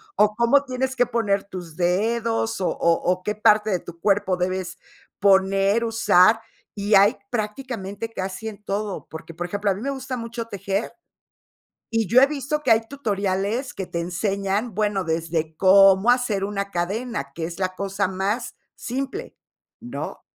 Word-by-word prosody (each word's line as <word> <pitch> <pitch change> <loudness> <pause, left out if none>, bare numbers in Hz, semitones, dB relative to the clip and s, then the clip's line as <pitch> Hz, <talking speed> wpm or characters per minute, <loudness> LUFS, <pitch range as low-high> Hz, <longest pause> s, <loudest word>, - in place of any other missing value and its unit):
o 210 0 +4
cómo 240 +4 +4
tienes 260 0 -2
que 245 - +3
poner 225 -5 0
tus 180 -5 -9
dedos, 225 +5 0
o 185 - 0
o 170 - +2 0.2
o 185 0 -1
qué 210 +2 -2
parte 215 0 +4
de 185 - +1
tu 170 0 -11
cuerpo 200 -1 +2
debes 185 0 -3 0.4
poner, 195 +2 +3
usar, 220 -1 +4 0.3
y 205 0 +1
hay 200 +1 +5
prácticamente 220 -2 -4
casi 195 +2 -5
en 210 -1 -8
todo. 205 0 -3
Porque, 160 +1 -9
por 175 - -4
ejemplo, 205 +3 -1
a 190 - +1
mí 200 - -8
me 275 +3 -2
gusta 265 -1 -5
mucho 230 0 -5
tejer, 200 +1 -3 1.0
y 225 -4 +1
yo 250 +4 +6
he 270 - +7
visto 295 +1 -2
que 235 - +5
hay 225 0 +1
tutoriales 210 -1 -2
que 190 -2 -5
te 170 - -3
enseñan, 195 +4 -2
bueno, 205 -2 0
desde 160 -1 -2
cómo 195 +3 +6
hacer 245 -6 +1
una 200 0 -3
cadena, 195 - -3
que 165 - -3
es 170 +3 -6
la 185 0 -1
cosa 195 -1 -1
más 205 +6 -2 0.2
simple, 275 - -5 0.4
¿no? - - -7
205 Hz, 165 wpm, -23 LUFS, 190-230 Hz, 1.0 s, he